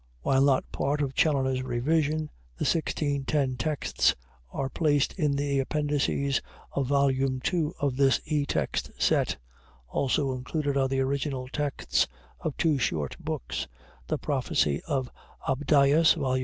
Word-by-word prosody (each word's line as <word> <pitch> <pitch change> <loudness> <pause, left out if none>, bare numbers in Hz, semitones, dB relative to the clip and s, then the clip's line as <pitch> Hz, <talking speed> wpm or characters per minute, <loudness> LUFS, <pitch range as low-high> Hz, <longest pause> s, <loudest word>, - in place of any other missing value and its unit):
While 135 0 +3
not 135 -2 +2
part 145 +2 -1
of 135 -1 -2
Challoner's 130 -4 +2
revision, 150 +5 0 0.3
the - - -2
1610 145 -4 0
texts 150 +4 +1 0.4
are 135 - -2
placed 145 0 +1
in 150 -6 +1
the 140 -1 0
appendices 140 -1 0 0.3
of 140 -2 -1
Vol. 140 0 +3
II 135 +5 0
of 140 -3 0
this 135 -3 +4
e 150 -2 0
text 75 -4 -1
set. - - +2 0.5
Also 135 - 0
included 140 +3 -2
are 135 -1 +3
the 135 0 0
original 135 -1 -1
texts 145 0 0 0.3
of 155 - -4
two 155 -4 +2
short 75 - -1
books, - - -4 0.4
'The - - 0
Prophecie 70 +1 0
of 130 -3 -1 0.4
Abdias' 145 +3 +4
(Vol. 130 -1 0
140 Hz, 135 wpm, -27 LUFS, 130-150 Hz, 0.5 s, this